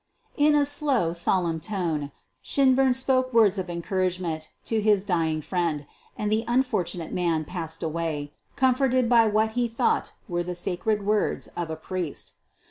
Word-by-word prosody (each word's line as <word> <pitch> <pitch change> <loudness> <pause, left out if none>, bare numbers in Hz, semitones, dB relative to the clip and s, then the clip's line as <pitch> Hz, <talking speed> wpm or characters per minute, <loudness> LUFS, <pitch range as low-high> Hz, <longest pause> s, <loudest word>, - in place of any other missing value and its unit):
In 295 0 +4
a 290 -1 +4
slow, 280 - +1
solemn 170 -1 0
tone 165 -7 -2 0.3
Shinburn 265 -1 +3
spoke 255 0 +2
words 215 -4 +4
of 185 -1 -4
en 170 -1 -4
couragement 180 -5 -2 0.2
to 225 -1 0
his 205 -2 +3
dying 165 -5 0
friend, 165 -5 -1 0.3
and 210 0 -2
the 220 +1 +2
unfortu 240 -8 0
nate 165 -2 -6
man 165 -3 0
passed 165 -1 -5
away, 155 -3 -3 0.2
comforted 255 -1 +2
by 230 -2 +5
what 215 +1 +2
he 240 +1 0
thought 230 0 0
were 175 -3 -1
the 180 +1 -4
sacred 195 +4 -1
words 210 0 0
of 170 -2 -5
a 160 - -3
priest. 170 -1 -5
190 Hz, 160 wpm, -26 LUFS, 170-235 Hz, 0.3 s, by